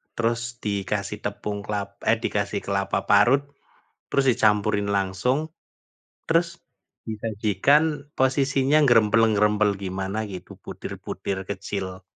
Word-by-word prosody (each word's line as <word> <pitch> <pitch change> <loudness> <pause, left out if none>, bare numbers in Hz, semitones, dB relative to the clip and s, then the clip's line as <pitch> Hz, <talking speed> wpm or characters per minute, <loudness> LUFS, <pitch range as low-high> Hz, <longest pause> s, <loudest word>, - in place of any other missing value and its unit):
terus 115 0 0 0.2
dikasih 100 0 -2
tepung 105 0 -3
kelap 100 -2 -3 0.2
eh, 115 - +4
dikasih 100 0 -1
kelapa 100 0 0
parut, 120 +8 +5 0.7
terus 140 - +1
dicampurin 105 -3 +2
langsung, 100 +8 0 0.9
terus 165 +1 +3 0.6
disajikan 110 - +2 0.3
posisinya 135 +2 +2
nggerempel-nggerempel 105 -3 +4
gimana 95 +2 -3 0.2
gitu 90 - -9
butir-butir 95 -1 -5
kecil. 95 -1 -5
105 Hz, 95 wpm, -24 LUFS, 100-115 Hz, 0.9 s, parut